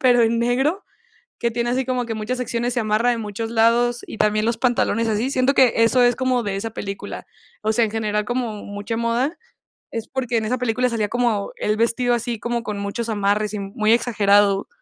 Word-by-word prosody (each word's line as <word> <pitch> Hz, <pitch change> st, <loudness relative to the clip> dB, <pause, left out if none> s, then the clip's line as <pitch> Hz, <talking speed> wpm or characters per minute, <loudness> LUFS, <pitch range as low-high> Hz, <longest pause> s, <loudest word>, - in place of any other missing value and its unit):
pero 245 Hz, -2 st, +5 dB
en 230 Hz, +1 st, +2 dB
negro, 265 Hz, -, +1 dB, 0.6 s
que 235 Hz, -, 0 dB
tiene 235 Hz, +1 st, -1 dB
así 260 Hz, +1 st, +1 dB
como 250 Hz, -2 st, -1 dB
que 230 Hz, -, -3 dB
muchas 220 Hz, +3 st, -3 dB
secciones, 240 Hz, 0 st, -2 dB
se 245 Hz, -, 0 dB
amarra 220 Hz, +2 st, +2 dB
en 230 Hz, -1 st, -2 dB
muchos 215 Hz, +2 st, -4 dB
lados, 235 Hz, +1 st, +2 dB
y -, -, -8 dB
también 215 Hz, 0 st, +2 dB
los 230 Hz, 0 st, 0 dB
pantalones 230 Hz, -2 st, +1 dB
así. 220 Hz, +4 st, 0 dB
Siento 260 Hz, +1 st, +2 dB
que 255 Hz, -3 st, +5 dB
eso 230 Hz, +2 st, +4 dB
es 245 Hz, -1 st, +4 dB
como 255 Hz, -2 st, 0 dB
de 200 Hz, -1 st, -2 dB
esa 210 Hz, +3 st, -3 dB
película. 200 Hz, -3 st, -6 dB, 0.4 s
O 220 Hz, +1 st, +1 dB
sea, 230 Hz, 0 st, +3 dB
en 210 Hz, -, -5 dB
general, 210 Hz, -1 st, -1 dB
como 240 Hz, -3 st, -3 dB
mucha 205 Hz, +3 st, -5 dB
moda, 240 Hz, +8 st, 0 dB, 0.5 s
es 225 Hz, -1 st, -5 dB
porque 250 Hz, -3 st, -2 dB
en 220 Hz, -, -1 dB
esa 250 Hz, +4 st, 0 dB
película 250 Hz, +1 st, 0 dB
salía 220 Hz, -3 st, -1 dB
como 235 Hz, -4 st, 0 dB
él 215 Hz, 0 st, -1 dB
vestido 240 Hz, +2 st, +1 dB
así, 235 Hz, -1 st, -2 dB
como 240 Hz, 0 st, -2 dB
con 210 Hz, -3 st, -4 dB
muchos 200 Hz, +4 st, -3 dB
amarres 210 Hz, 0 st, 0 dB
y 210 Hz, -, -3 dB
muy 215 Hz, +3 st, +1 dB
exagerado. 205 Hz, -4 st, +3 dB
230 Hz, 210 wpm, -21 LUFS, 215-245 Hz, 0.6 s, pero